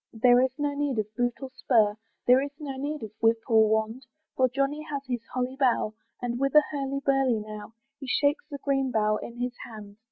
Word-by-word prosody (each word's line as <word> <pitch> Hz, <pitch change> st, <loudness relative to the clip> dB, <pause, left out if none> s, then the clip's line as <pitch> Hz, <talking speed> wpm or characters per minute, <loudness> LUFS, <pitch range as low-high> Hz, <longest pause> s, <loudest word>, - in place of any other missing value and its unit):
There 245 Hz, +2 st, +5 dB
is 260 Hz, -, +3 dB
no 290 Hz, -1 st, -1 dB
need 285 Hz, -3 st, -1 dB
of 215 Hz, 0 st, -3 dB
boot 245 Hz, -1 st, 0 dB
or 265 Hz, -, -6 dB
spur, 220 Hz, -5 st, +3 dB, 0.3 s
There 250 Hz, +2 st, +6 dB
is 285 Hz, -, -3 dB
no 280 Hz, -3 st, -6 dB
need 290 Hz, +2 st, -4 dB
of 215 Hz, -, -6 dB
whip 225 Hz, 0 st, +4 dB
or 220 Hz, -3 st, +5 dB
wand, 220 Hz, +4 st, -1 dB, 0.3 s
For 255 Hz, -1 st, +3 dB
Johnny 275 Hz, +4 st, -1 dB
has 280 Hz, -2 st, -3 dB
his 245 Hz, -3 st, -2 dB
holly 255 Hz, +1 st, -1 dB
bough, 245 Hz, -5 st, +2 dB, 0.3 s
And 240 Hz, 0 st, -3 dB
with 275 Hz, +1 st, 0 dB
a 300 Hz, -, +9 dB
hurly 275 Hz, -1 st, -2 dB
burly 270 Hz, -4 st, +3 dB
now 215 Hz, +1 st, -9 dB, 0.2 s
He 270 Hz, -, -8 dB
shakes 285 Hz, +4 st, +1 dB
the 285 Hz, -, -5 dB
green 270 Hz, -2 st, +1 dB
bough 215 Hz, -2 st, +2 dB
in 235 Hz, -, -8 dB
his 245 Hz, 0 st, -2 dB
hand. 205 Hz, -3 st, -10 dB
255 Hz, 215 wpm, -27 LUFS, 225-275 Hz, 0.3 s, a